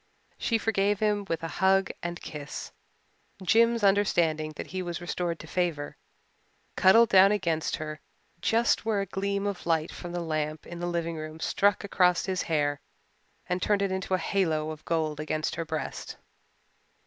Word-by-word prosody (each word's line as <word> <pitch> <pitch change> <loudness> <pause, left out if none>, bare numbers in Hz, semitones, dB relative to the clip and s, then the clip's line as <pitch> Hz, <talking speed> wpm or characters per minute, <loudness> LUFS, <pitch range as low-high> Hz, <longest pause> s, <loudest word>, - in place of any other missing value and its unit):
She 230 - +1
forgave 205 -2 +1
him 210 -1 +1
with 165 0 -2
a - - -1
hug 190 0 +4
and 175 0 -4
kiss. 150 -1 -7 0.7
Jims, 230 +3 +4
understanding 170 -6 +2
that - - -5
he 185 0 -4
was 175 -2 -4
restored 175 -1 -2
to - - -10
favour, 170 -5 -2 0.8
cuddled 225 +4 +6
down 195 +1 +7
against 170 -6 0
her 155 0 -6 0.4
just 230 +1 +2
where 215 -2 +1
a - - -2
gleam 200 +1 -2
of 200 -4 -4
light 160 -1 +1
from 175 - -7
the 175 0 -3
lamp 155 -1 -2
in 175 - -8
the 175 - -2
living 170 -1 -2
room 155 +1 -7
struck 200 +5 +2
across 180 -3 +2
his 185 -2 -1
hair 145 -3 0 0.7
and 180 0 -1
turned 205 0 +2
it 195 - 0
into 190 0 -1
a - - +1
halo 160 -4 0
of 155 0 -9
gold 155 -3 -1
against 155 +1 -2
her 165 - -3
breast. 155 -3 -5
175 Hz, 170 wpm, -28 LUFS, 160-200 Hz, 0.8 s, down